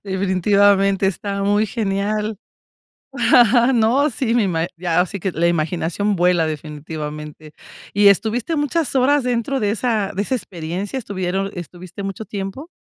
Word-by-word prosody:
definitivamente 195 Hz, +1 st, +2 dB
está 200 Hz, +1 st, -2 dB
muy 205 Hz, +2 st, +2 dB
genial, 210 Hz, 0 st, -2 dB, 1.4 s
no, 240 Hz, +6 st, +3 dB
sí, 230 Hz, -1 st, -1 dB
me 240 Hz, -3 st, +3 dB
ima 165 Hz, -3 st, 0 dB
ya, 175 Hz, 0 st, +1 dB
sí 200 Hz, +1 st, -7 dB
que 190 Hz, -, -1 dB
la 165 Hz, +2 st, +1 dB
imaginación 170 Hz, +4 st, 0 dB
vuela, 175 Hz, -2 st, +3 dB
definitivamente, 150 Hz, 0 st, -7 dB, 0.4 s
¿y 205 Hz, 0 st, +5 dB
estuviste 225 Hz, -, +1 dB
muchas 295 Hz, 0 st, 0 dB
horas 280 Hz, +3 st, +3 dB
dentro 250 Hz, +2 st, -1 dB
de 205 Hz, -2 st, +1 dB
esa 220 Hz, -3 st, -1 dB
de 195 Hz, -, -1 dB
esa 235 Hz, -, -2 dB
experiencia, 185 Hz, +1 st, -4 dB
estuvieron 195 Hz, -3 st, -3 dB
estuviste 175 Hz, +1 st, -8 dB
mucho 195 Hz, +2 st, -5 dB
tiempo? 200 Hz, -, -6 dB
200 Hz, 135 wpm, -20 LUFS, 175-220 Hz, 1.4 s, y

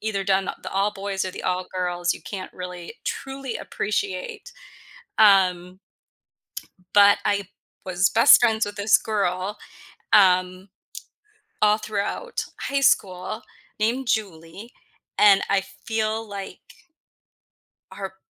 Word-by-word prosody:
either 215 Hz, -2 st, -2 dB
done 195 Hz, 0 st, +2 dB
th -, -, -4 dB
the -, -, -6 dB
all-boys 195 Hz, 0 st, -1 dB
or 185 Hz, -, -3 dB
the -, -, -8 dB
all-girls, 180 Hz, -1 st, -2 dB
you -, -, -11 dB
can't 190 Hz, -3 st, -7 dB
really 180 Hz, +1 st, -8 dB
truly 270 Hz, -2 st, -5 dB
appreciate, 440 Hz, -, -4 dB, 0.7 s
um 185 Hz, -3 st, +4 dB, 1.2 s
but 205 Hz, 0 st, +6 dB
I 200 Hz, -2 st, 0 dB, 0.4 s
was 185 Hz, 0 st, +1 dB
best 225 Hz, -, +7 dB
friends 220 Hz, -2 st, +2 dB
with 205 Hz, 0 st, -7 dB
this 200 Hz, +1 st, +4 dB
girl, 200 Hz, -1 st, -2 dB, 0.6 s
um, 185 Hz, -1 st, +3 dB, 0.9 s
all 210 Hz, 0 st, +4 dB
throughout 215 Hz, -, -3 dB, 0.2 s
high 280 Hz, 0 st, -1 dB
school 190 Hz, -3 st, +1 dB, 0.4 s
named 235 Hz, +4 st, -1 dB
Julie, 195 Hz, +1 st, -4 dB, 0.5 s
and 200 Hz, -2 st, +6 dB
I 195 Hz, -1 st, +2 dB, 0.2 s
feel 220 Hz, 0 st, -1 dB
like 200 Hz, -, -10 dB, 1.1 s
her -, -, -7 dB
200 Hz, 110 wpm, -23 LUFS, 185-220 Hz, 1.2 s, best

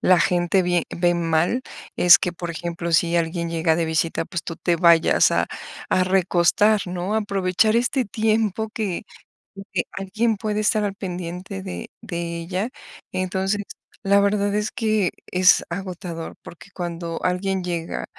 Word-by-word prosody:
la 185 Hz, -1 st, +5 dB
gente 175 Hz, +2 st, +2 dB
vie 175 Hz, -2 st, +1 dB
ve 175 Hz, 0 st, +1 dB
mal 170 Hz, +7 st, +1 dB, 0.4 s
es 175 Hz, -1 st, +8 dB
que, 180 Hz, -, -2 dB
por 175 Hz, -1 st, -5 dB
ejemplo, 170 Hz, 0 st, -4 dB
si 170 Hz, +1 st, +3 dB
alguien 170 Hz, 0 st, -1 dB
llega 165 Hz, -1 st, +1 dB
de 170 Hz, -, +1 dB
visita, 160 Hz, +1 st, 0 dB
pues, 170 Hz, +1 st, -5 dB
tú 165 Hz, -, -6 dB
te 175 Hz, -1 st, 0 dB
vayas 170 Hz, -1 st, +5 dB
a -, -, +2 dB, 0.4 s
a 185 Hz, -, +3 dB
recostar, 190 Hz, +3 st, +3 dB
¿no?, 180 Hz, +3 st, -3 dB
aprovechar 200 Hz, 0 st, +1 dB
este 250 Hz, +2 st, +1 dB
tiempo 220 Hz, 0 st, 0 dB
que 200 Hz, -6 st, -2 dB, 0.5 s
en 195 Hz, -, -8 dB
que 175 Hz, -, +1 dB
alguien 215 Hz, +4 st, -1 dB
puede 210 Hz, 0 st, -2 dB
estar 215 Hz, 0 st, +2 dB
al 200 Hz, -1 st, -1 dB
pendiente 185 Hz, 0 st, -6 dB
de 185 Hz, -2 st, -6 dB
de 170 Hz, -2 st, -4 dB
ella, 185 Hz, +6 st, -3 dB, 0.4 s
entonces, 190 Hz, +2 st, -1 dB, 0.4 s
la 200 Hz, +1 st, +4 dB
verdad 200 Hz, 0 st, +1 dB
es 210 Hz, 0 st, 0 dB
que 215 Hz, -5 st, +1 dB, 0.2 s
es 185 Hz, 0 st, +5 dB
agotador, 175 Hz, -2 st, -6 dB
porque 175 Hz, -, -12 dB
cuando 170 Hz, -2 st, -4 dB
alguien 185 Hz, +1 st, 0 dB
llega 170 Hz, -2 st, -3 dB
180 Hz, 155 wpm, -23 LUFS, 170-200 Hz, 0.5 s, es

